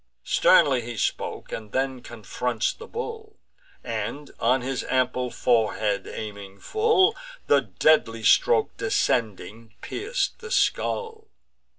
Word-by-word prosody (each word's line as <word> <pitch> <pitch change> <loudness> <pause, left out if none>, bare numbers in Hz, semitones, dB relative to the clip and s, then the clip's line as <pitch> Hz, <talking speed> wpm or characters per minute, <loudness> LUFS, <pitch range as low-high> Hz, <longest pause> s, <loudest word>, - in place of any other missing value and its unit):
Sternly 130 -4 +4
he 120 0 -7
spoke, - - -3
and 105 -2 -7
then 130 -1 -1
confronts 120 +1 -3
the 460 - -12
bull; 450 -2 -7 0.5
And, 145 0 -5
on 125 +3 +2
his 130 +1 -3
ample 125 -1 0
forehead 110 -5 0
aiming 100 -2 -8
full, 435 -1 +3 0.3
The - - +4
deadly 115 -8 +2
stroke, 445 - +3
descending, 115 - -1
pierc'd 485 +5 -2
the 455 -1 -9
skull. 450 -2 -1
125 Hz, 110 wpm, -25 LUFS, -, 0.5 s, Sternly